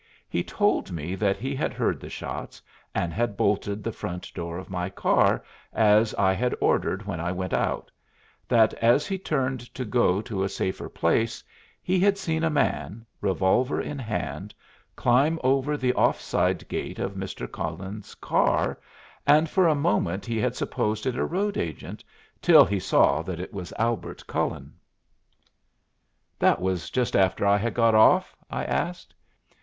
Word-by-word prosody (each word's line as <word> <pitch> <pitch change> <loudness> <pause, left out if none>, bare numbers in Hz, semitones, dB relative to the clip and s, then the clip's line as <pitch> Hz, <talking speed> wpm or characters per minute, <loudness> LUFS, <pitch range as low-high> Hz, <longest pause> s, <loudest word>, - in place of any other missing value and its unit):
He - - -1
told - - 0
me 85 +1 -4
that 100 0 0
he 130 +7 -3
had - - -2
heard - - 0
the - - -9
shots, - - -6 0.4
and 85 -2 -1
had 115 -2 -1
bolted 100 0 0
the 115 - -2
front 90 -5 -6
door 85 0 -5
of 95 - -8
my 90 0 -2
car, 95 - +2 0.3
as 110 0 +4
I 95 -1 +3
had 125 +5 0
ordered 95 +2 +1
when 95 -5 -4
I 85 +1 -2
went 95 0 -4
out; - - -1 0.6
that 110 -2 +4
as 120 +5 +4
he 195 -1 -3
turned 135 -7 -1 0.2
to 130 - -3
go 105 -5 +2
to 105 -3 -3
a 95 - -1
safer 95 -1 -3
place, 110 +7 0 0.4
he 185 +1 +1
had 200 +1 +3
seen 165 -4 -2
a 165 - +3
man, 110 - -1 0.2
revolver 95 +7 +1
in 145 - -4
hand, 110 -4 -4 0.4
climb 140 +7 +3
over 135 +3 +2
the 125 -2 +1
off - - +2
side - - 0
gate - - -4
of - - -3
Mr. 60 - -5
Cullen's 100 +2 -6
car, - - +1 0.5
and 155 +2 +5
for 185 -3 +4
a 155 - +3
moment 100 -9 0
he 115 -2 -2
had - - 0
supposed 105 0 -2
it 130 -2 0
a - - 0
road 200 +4 -1
agent, 80 -3 -5 0.4
till - - +8
he 100 -1 -1
saw 85 - +3
that 85 0 -5
it 90 - -7
was 95 -3 -6
Albert 115 0 -2
Cullen. - - -3 1.7
"That - - +4
was 95 -2 -2
just 125 -1 0
after 95 0 +2
I 100 0 +5
had 115 +3 -2
got 115 -1 +4
off?" 110 0 +5
I - - -3
asked. 175 0 -3
110 Hz, 170 wpm, -26 LUFS, 95-130 Hz, 1.7 s, till